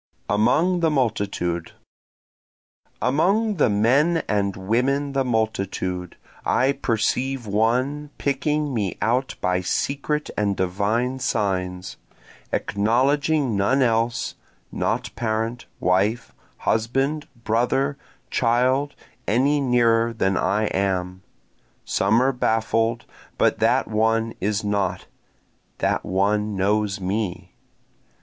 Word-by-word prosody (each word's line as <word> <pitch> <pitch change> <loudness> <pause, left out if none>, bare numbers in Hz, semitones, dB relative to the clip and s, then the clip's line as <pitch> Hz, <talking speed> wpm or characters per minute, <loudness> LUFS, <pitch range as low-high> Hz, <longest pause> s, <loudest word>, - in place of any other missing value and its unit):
Among 160 - +2
the 165 -1 +2
Multitude 100 - -1 1.3
Among 195 - +2
the 145 - +3
men 135 +11 +3
and 100 -2 0
women 130 +9 0
the 135 -1 +1
multitude, 100 -6 -2 0.3
I 130 +2 +2
perceive 125 +1 -1
one 125 +8 0
picking 145 +1 -1
me 105 -6 -2
out 125 +4 0
by 90 0 +1
secret 145 +9 -1
and 100 -2 0
divine 105 +8 0
signs, 90 -5 -2 0.5
Acknowledging 130 - +1
none 130 +8 +2
else, 115 +1 0 0.4
not - - -2
parent, 115 +1 -2
wife, 100 +6 +1 0.2
husband, 135 +7 0 0.2
brother, 125 +5 +1 0.4
child, 130 +4 +1 0.3
any 140 +7 +2
nearer 115 -3 +3
than 95 -4 0
I 105 +4 +1
am, 95 -2 -1 0.6
Some 110 +5 +2
are 135 - +3
baffled, 115 -1 0 0.3
but - - +2
that - - +2
one 110 +1 +1
is 105 +2 0
not 100 -3 -1 0.7
that - - 0
one 105 +2 0
knows 100 +1 0
me. 95 0 -3
115 Hz, 100 wpm, -23 LUFS, 100-135 Hz, 1.3 s, the